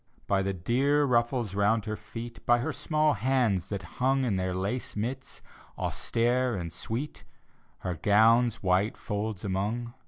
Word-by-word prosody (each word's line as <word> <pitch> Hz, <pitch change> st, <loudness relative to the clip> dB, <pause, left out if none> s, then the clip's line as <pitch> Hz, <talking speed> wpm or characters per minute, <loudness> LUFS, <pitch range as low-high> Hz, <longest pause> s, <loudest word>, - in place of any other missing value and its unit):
By 100 Hz, -1 st, +2 dB
the 100 Hz, +1 st, 0 dB
dear 135 Hz, +11 st, +2 dB
ruffles 120 Hz, -4 st, +1 dB
round 105 Hz, +2 st, +2 dB
her 110 Hz, 0 st, -2 dB
feet, 115 Hz, +2 st, -9 dB
By 120 Hz, -, +6 dB
her 145 Hz, +6 st, -2 dB
small 155 Hz, 0 st, +1 dB
hands 115 Hz, -7 st, +1 dB
that 100 Hz, -4 st, -4 dB, 0.2 s
hung 135 Hz, +1 st, +3 dB
In 110 Hz, -5 st, 0 dB
their 95 Hz, -1 st, -1 dB
lace 100 Hz, +7 st, -3 dB
mitts, 125 Hz, +5 st, -4 dB, 0.3 s
austere 120 Hz, +1 st, 0 dB
and 85 Hz, -3 st, -5 dB
sweet. 120 Hz, -, -4 dB, 0.6 s
Her 90 Hz, -, -2 dB
gown's 115 Hz, +5 st, +4 dB
white 95 Hz, +3 st, +2 dB
folds 105 Hz, -2 st, -3 dB
among. 105 Hz, +5 st, -2 dB
115 Hz, 150 wpm, -28 LUFS, 100-125 Hz, 0.6 s, By